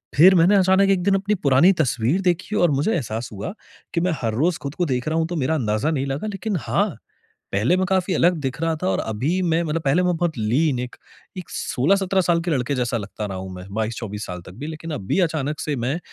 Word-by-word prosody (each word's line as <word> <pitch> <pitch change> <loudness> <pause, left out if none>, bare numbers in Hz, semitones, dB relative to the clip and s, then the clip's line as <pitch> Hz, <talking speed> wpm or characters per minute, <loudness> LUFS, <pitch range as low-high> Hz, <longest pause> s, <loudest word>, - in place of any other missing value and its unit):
फिर 185 +6 +7
मैंने 180 +4 +5
अचानक 190 +1 +4
एक 185 -2 +2
दिन 195 0 +3
अपनी 200 +2 0
पुरानी 145 +3 +4
तस्वीर 130 +8 0
देखी 185 +3 0
और 175 -5 +3
मुझे 145 +11 +1
एहसास 115 -5 -3
हुआ 105 - -5 0.4
कि 170 - +1
मैं 180 0 +1
हर 110 -2 -1
रोज़ 160 +8 +1
खुद 140 +1 -5
को 175 - 0
देख 125 -1 -2
रहा 160 +1 0
हूँ 165 0 +1
तो 175 - -4
मेरा 155 +2 0
अंदाजा 115 +3 0
नहीं 135 -3 -1
लगा। 140 +10 -3
लेकिन 200 0 -3
हाँ। 115 -1 0 0.6
पहले 110 - +3
मैं 185 - +1
काफ़ी 190 -1 +1
अलग 175 +1 +4
दिख 135 +1 -3
रहा 165 -1 +1
था - - 0
और 95 - 0
अभी 140 - -1
मैं 170 -1 +1
मतलब 160 0 -2
पहले 160 +6 +2
मैं 180 -1 +1
बहुत 170 -5 -1
लीन 125 +5 +1
एक 125 0 -5 0.4
एक 180 - -7
16-17 190 +7 +1
साल 170 -1 +2
के 175 - -1
लड़के 135 0 0
जैसा 120 -2 0
लगता 105 +1 -6
रहा 95 -1 -5
हूँ 95 0 -6
मैं, 90 0 -9
22-24 110 -1 -3
साल 90 -1 -6
तक - - -10
भी। 150 - -4
लेकिन 160 +1 -6
अभी 145 - -1
अचानक 150 -1 -3
से 150 - -2
मैं 130 +7 -2
155 Hz, 240 wpm, -22 LUFS, 125-180 Hz, 0.6 s, फिर